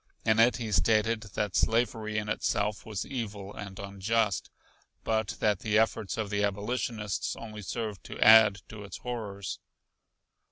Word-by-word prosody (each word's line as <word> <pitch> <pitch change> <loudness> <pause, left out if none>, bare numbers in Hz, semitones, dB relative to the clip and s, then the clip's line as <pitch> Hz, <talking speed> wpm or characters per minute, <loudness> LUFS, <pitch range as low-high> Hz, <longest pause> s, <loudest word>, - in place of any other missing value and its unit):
In 110 0 +3
it 120 +3 +5
he 115 -4 -4
stated 110 +5 +2
that 105 -3 -1
slavery 110 -2 +1
in 105 0 -1
itself 105 0 -1
was 105 -3 -3
evil 105 -6 -5
and 95 -2 -8
unjust, 100 +1 -1 0.5
but 110 -2 0
that 105 -3 +2
the 105 -1 +1
efforts 110 -2 +1
of 105 -2 -3
the 105 0 +1
abolitionists 105 0 -2
only 110 -2 -8
served 105 0 -4
to - - -8
add 105 -3 +7
to 105 -1 -8
its 100 - -8
horrors. 105 -6 -5
105 Hz, 150 wpm, -29 LUFS, 100-110 Hz, 0.5 s, add